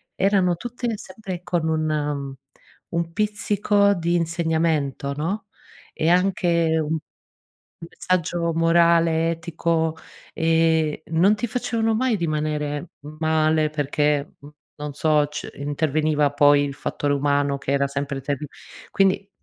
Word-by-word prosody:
erano 190 -2 +2
tutte 240 +2 -4
sempre 185 -2 -7
con 170 -3 -1
un, 160 0 0
mhmm, 145 -2 -2 0.6
un 170 0 -2
pizzico 205 0 +2
di 170 -1 -1
insegnamento, 160 -4 0
no, 175 +10 -3 0.5
e 160 - 0
anche 170 -3 +2
un 155 +1 -1 0.9
messaggio 170 -2 -1
morale, 165 0 +3
etico, 165 -1 -1 0.4
ehm, 160 -1 +2
non 170 +6 +3
ti 215 +3 -3
facevano 225 -1 -1
mai 250 0 +1
rimanere 150 -2 -2 0.3
male, 155 -1 +2
perché 145 0 0
n 145 - -12 0.3
non 150 -1 -6
so 150 0 +2
ce 150 +1 -7
interveniva 150 0 0
poi 145 -1 +5
il 140 - -4
fattore 145 +1 -2
umano 140 0 +1
che 135 - -3
era 140 0 +2
sempre 140 0 -4
terri 140 +1 -3 0.5
quindi, 195 +1 +1
160 Hz, 120 wpm, -23 LUFS, 150-175 Hz, 0.9 s, poi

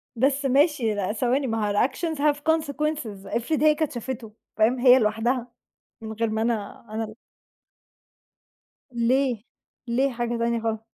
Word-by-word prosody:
بس 275 +3 +1
ماشي، 270 -4 +3
لأ 205 +1 -1
ثواني، 255 +4 0
ما 225 -2 -1
هو - - -1
الactions 315 - 0
have 295 0 +3 0.2
consequences 300 -10 -2
إفرض 285 +6 0
هي 305 -1 +5
كانت 315 -1 -1
شافتُه، 240 -2 -6 0.3
فاهم، 230 +4 +3
هي 255 0 +7
لوحدها 230 +3 0 0.5
من 220 0 -6
غير 225 0 -1
ما 220 0 -1
أنا، 225 -1 -2
أنا 220 +1 -3
ال 215 0 -8 1.8
ليه، 245 -1 +1 0.4
ليه 260 +4 +1
حاجة 240 -1 -2
تانية 235 0 0
خالص؟ 220 -1 -1
240 Hz, 150 wpm, -25 LUFS, 220-275 Hz, 1.8 s, هي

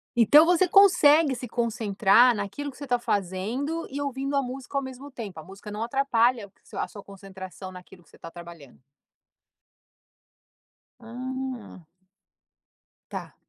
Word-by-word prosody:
Então, 285 +7 +7
você 355 +1 +3
consegue 330 -7 +5
se 250 +1 -7
concentrar 230 0 +3
naquilo 205 +8 -5
que 265 - -13
você - - -9
está 250 -3 0
fazendo 225 - -2
e 280 +2 -5
ouvindo 275 0 -3
a 280 - +3
música 265 +1 -6
ao - - +1
mesmo 260 +2 -9
tempo, 215 - -8
a - - -9
música 195 +4 -11
não 210 +2 -4
atrapalha 240 -4 +1
sua - - -4
a - - -5
sua 200 - -11
concentração 190 -1 -10
naquilo 180 0 -14
que 150 - -27
você - - -19
tá 165 - -9
trabalhando. 170 -7 -13 2.2
Ah. 250 -4 -7 1.3
Tá. - - -7
240 Hz, 140 wpm, -26 LUFS, 195-275 Hz, 2.2 s, Então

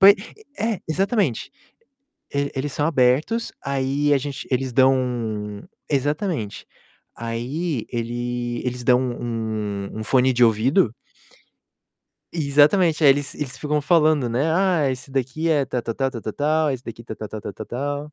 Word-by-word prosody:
Poi 200 +1 +9 0.4
é, 220 -3 -1
exatamente. 190 - 0 0.8
E 140 0 0
eles 135 +1 -2
são 150 - 0
abertos, 150 - +2
aí 140 +1 +1
a - - +4
gente 140 0 -5
eles 130 0 0
dão 130 +1 +5 0.9
exatamente. 145 - -1 0.5
Aí 120 +5 -3
ele 120 0 -3
eles 125 0 -3
dão 125 0 +4
um 110 -5 -3
um - - -3
fone 130 +2 +3
de 125 0 +4
ouvido 115 - +3 1.4
Exatamente, 155 +2 +3
aí 140 - +8
eles 145 0 0
eles 135 -3 -5
ficam 150 0 0
falando, 155 -4 +3
né, 135 +8 +1
"Ah, 175 -6 +2
esse 130 +1 -5
daqui 135 +5 -1
é 150 -3 +3
tal, 125 -1 -3
tal, 115 - -3
tal, 135 -1 0
tal, 115 -4 -6
tal, 110 - -4
tal, 155 +2 +1
esse 130 -2 -4
daqui 115 0 -8
tal, 110 - -7
tal, 110 - -6
tal, 100 - -6
tal, 110 - -8
tal". 145 +4 -4
135 Hz, 150 wpm, -23 LUFS, 120-150 Hz, 1.4 s, Poi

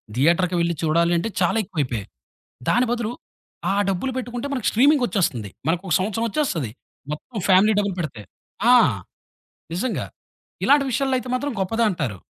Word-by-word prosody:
థియేటర్‌కి 170 +7 +2
వెళ్లి 170 0 +1
చూడాలి 170 +2 +3
అంటే 170 +7 -1
చాలా 180 +5 +2
ఎక్కువైపోయాయి. 130 - -3 0.6
దాని 245 +1 +3
బదులు 235 -2 -1 0.6
ఆ - - +1 0.2
డబ్బులు 195 +8 -1
పెట్టుకుంటే, 245 +1 -4
మనకి 255 -6 -1
స్ట్రీమింగొచ్చేస్తుంది 220 - +2 0.2
మనకు 170 +3 +1
ఒక - - +2
సంవత్సరం 215 +4 -1
ఒచ్చేస్తది. 190 - -1 0.4
మొత్తం 210 +10 -7
ఫ్యామిలీ 195 +3 +6
డబ్బులు 200 -2 -1
పెడితే. 145 -10 -4 0.5
ఆ! - - +8 1.0
నిజంగా 225 +7 -2 0.6
ఇలాంటి 285 0 +5
విషయాల్లో 265 +2 +1
అయితే 250 - -7
మాత్రం 285 +3 -1
గొప్పదంటారు. 185 - 0
195 Hz, 135 wpm, -23 LUFS, 170-245 Hz, 1.0 s, ఆ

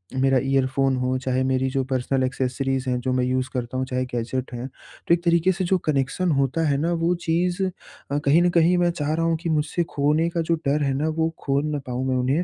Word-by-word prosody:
मेरा 135 0 +3
ईयरफोन 135 0 +1
हो, 130 0 0
चाहे 130 0 -1
मेरी 130 0 +1
जो 135 0 0
पर्सनल 130 0 -1
एक्सेसरीज़ 130 0 -1
हैं 125 - 0
जो 130 +1 -1
मैं 125 0 +1
यूज़ 130 0 -1
करता 125 0 -3
हूँ 130 - -1
चाहे 130 0 -2
गैजेट 125 +2 -3
हैं। 120 +2 -5
तो 135 +5 -4
एक 170 0 +1
तरीके 170 +2 +3
से 185 +1 -2
जो 185 +2 +2
कनेक्शन 145 +6 0
होता 150 +4 0
है 140 -1 +2
ना 165 +4 0
वो 175 - +3
चीज़ 175 +3 0
अ, 180 -6 -5
कहीं 150 +5 +5
न 175 - +3
कहीं 175 +2 +4
मैं 175 -1 +2
चाह 155 -3 -2
रहा 165 +1 0
हूँ 165 -1 +1
कि 170 - -1
मुझसे 155 +2 0
खोने 150 +4 +2
का 170 0 -1
जो 165 +1 +1
डर 145 +2 +1
है 140 -1 +1
ना 145 +4 -1
वो 160 0 +2
खो 140 0 +1
ना 145 - -1
पाऊँ 125 +1 -2
मैं 130 - +1
उन्हें। 125 0 0
135 Hz, 240 wpm, -23 LUFS, 130-165 Hz, -, कहीं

